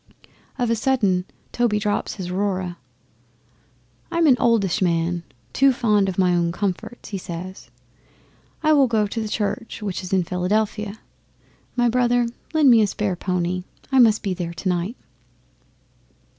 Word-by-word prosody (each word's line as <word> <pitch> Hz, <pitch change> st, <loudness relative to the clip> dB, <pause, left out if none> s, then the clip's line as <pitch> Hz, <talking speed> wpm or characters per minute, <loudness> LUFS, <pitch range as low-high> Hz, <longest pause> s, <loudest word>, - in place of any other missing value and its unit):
Of 245 Hz, -3 st, 0 dB
a -, -, +3 dB
sudden 210 Hz, -7 st, +1 dB, 0.3 s
Toby 235 Hz, -3 st, +1 dB
drops 210 Hz, -1 st, -1 dB
his 185 Hz, -3 st, -5 dB
Aurora. 185 Hz, -2 st, -2 dB, 1.3 s
'"I 335 Hz, -, -3 dB
am 335 Hz, -, +4 dB
an 275 Hz, -5 st, +6 dB
oldish 215 Hz, -7 st, +2 dB
man, 170 Hz, -1 st, +1 dB, 0.3 s
too 275 Hz, 0 st, +5 dB
fond 210 Hz, -6 st, +2 dB
of 185 Hz, -, -5 dB
my 180 Hz, -2 st, +3 dB
own 170 Hz, -1 st, +1 dB
comforts," 205 Hz, +5 st, -4 dB
he 195 Hz, -, -4 dB
says. 180 Hz, -3 st, -8 dB, 0.9 s
"I 310 Hz, 0 st, +5 dB
will 280 Hz, -3 st, +5 dB
go 220 Hz, -3 st, +2 dB
to 225 Hz, +3 st, -3 dB
the 220 Hz, -, -3 dB
Church 220 Hz, +2 st, -3 dB
which 195 Hz, -3 st, -3 dB
is 185 Hz, -, -8 dB
in 190 Hz, -2 st, +3 dB
Philadelphia. 205 Hz, +4 st, -1 dB, 0.7 s
My 245 Hz, -1 st, +3 dB
brother, 245 Hz, 0 st, +2 dB, 0.3 s
lend 305 Hz, -5 st, +5 dB
me 230 Hz, -2 st, +6 dB
a 210 Hz, -, +3 dB
spare 200 Hz, -1 st, -2 dB
pony. 180 Hz, 0 st, -2 dB, 0.3 s
I 265 Hz, -, +4 dB
must 225 Hz, -3 st, +5 dB
be 195 Hz, -3 st, -1 dB
there 170 Hz, -2 st, -5 dB
tomorrow 175 Hz, 0 st, -1 dB
night." 230 Hz, +7 st, -7 dB
205 Hz, 155 wpm, -22 LUFS, 180-235 Hz, 1.3 s, an